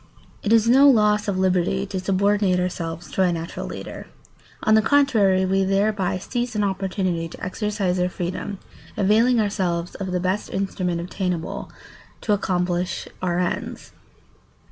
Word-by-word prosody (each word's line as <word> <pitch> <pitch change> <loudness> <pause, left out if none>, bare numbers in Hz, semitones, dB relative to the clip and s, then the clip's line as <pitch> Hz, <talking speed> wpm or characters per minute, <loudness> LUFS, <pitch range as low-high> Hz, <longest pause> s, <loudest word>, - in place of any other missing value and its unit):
] - - -29
It 215 - -1
is 225 -1 +5
no 270 +4 +7
loss 210 -4 +3
of 200 -2 0
liberty 185 +1 +1
to 195 -1 -4
subordinate 195 0 +2
ourselves 165 -3 -4
to - - 0
a 180 -2 +3
natural 165 0 -5
leader. - - -8 0.6
On 215 - +4
the 220 - +6
contrary, 215 -8 +3
we 195 +1 +2
thereby 195 -1 +1
seize 240 +5 -3
an 210 - +1
opportunity 190 -3 -1
to - - -8
exercise 195 -2 -1
our 180 0 +1
freedom, 180 +3 -4 0.4
availing 225 +5 +3
ourselves 180 -5 -1
of 190 -2 -5
the 180 - 0
best 185 +3 -1
instrument 185 -3 -2
obtainable 180 -1 -4 0.5
to 210 - +1
accomplish 180 -2 -1
our 175 -2 0
ends. 180 -1 -3
190 Hz, 150 wpm, -23 LUFS, 180-210 Hz, 0.6 s, no